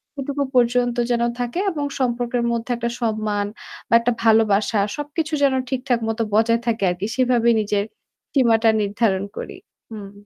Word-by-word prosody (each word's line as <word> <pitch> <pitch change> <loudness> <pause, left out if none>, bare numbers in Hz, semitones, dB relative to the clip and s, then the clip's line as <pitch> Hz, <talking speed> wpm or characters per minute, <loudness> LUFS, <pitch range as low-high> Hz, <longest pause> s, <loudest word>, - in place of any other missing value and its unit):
সেটুকু 280 0 -2
পর্যন্ত 245 0 +2
যেন 235 -1 +1 0.2
থাকে 245 +8 -2
এবং 295 -3 -3
সম্পর্কের 245 -1 -1
মধ্যে 235 +1 -3
একটা 235 0 -2
সম্মান 215 -2 -1 0.4
বা - - -1
একটা 235 +1 0
ভালোবাসা 220 -1 +3 0.2
সবকিছু 295 +2 -4
যেন 275 -1 +4 0.2
ঠিকঠাক 255 -2 0
মত 225 +1 -3
বজায় 230 +2 +3
থাকে 230 -3 0
আরকি। 180 +3 -4
সেভাবেই 240 -3 +3
নিজের 205 -1 -1 0.5
সীমাটা 230 -4 +4
নির্ধারণ 205 -1 0
করি। - - -7 0.3
হুম। 205 -3 -8
235 Hz, 145 wpm, -21 LUFS, 215-250 Hz, 0.5 s, যেন